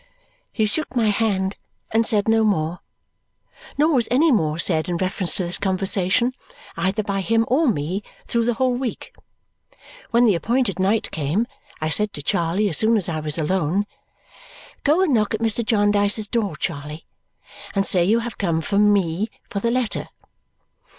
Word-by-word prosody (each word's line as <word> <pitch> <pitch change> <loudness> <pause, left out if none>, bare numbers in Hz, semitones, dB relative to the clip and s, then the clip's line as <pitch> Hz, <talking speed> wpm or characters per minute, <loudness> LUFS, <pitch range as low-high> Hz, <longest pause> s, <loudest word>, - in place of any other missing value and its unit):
He 220 - 0
shook 285 +6 -3
my 225 -3 +2
hand 200 -3 0 0.3
and 225 +1 +2
said 210 -3 +2
no 225 0 +3
more. 175 -5 0 1.0
Nor 310 +3 +3
was 245 -5 +2
any 295 +6 +3
more 155 - +1
said 160 0 +1
in 175 - -1
reference 185 -2 -2
to 185 - 0
this 175 0 -2
conversation, 195 +5 +1 0.4
either 190 +5 -1
by 200 -1 -2
him 225 +3 +1
or 290 +6 +2
me, 185 - -1 0.2
through 235 -1 0
the 240 -1 0
whole 255 +1 +1
week. 245 -1 -5 1.0
When 235 +1 +4
the 215 - +4
appointed 225 +4 0
night 200 +4 +1
came, 160 +9 -1 0.3
I 155 - -2
said 210 +6 +2
to 145 - -8
Charley 170 +7 0
as 165 - +3
soon 225 +1 +3
as 190 -4 0
I 160 -2 -2
was 155 0 0
alone, 180 +4 0 1.0
"Go 310 +6 +3
and 320 -7 +1
knock 220 -1 +1
at - - -5
Mr. 230 +1 0
Jarndyce's 205 -1 +2
door, 205 -7 -1
Charley, 150 0 -5 0.7
and 195 0 +1
say 180 -3 +4
you 220 +6 +2
have 235 0 -7
come 170 -5 0
from 205 +4 +3
me 195 +1 0 0.2
'for 200 - -2
the 230 - 0
letter.'" 245 -2 -1
205 Hz, 170 wpm, -22 LUFS, 180-230 Hz, 1.0 s, When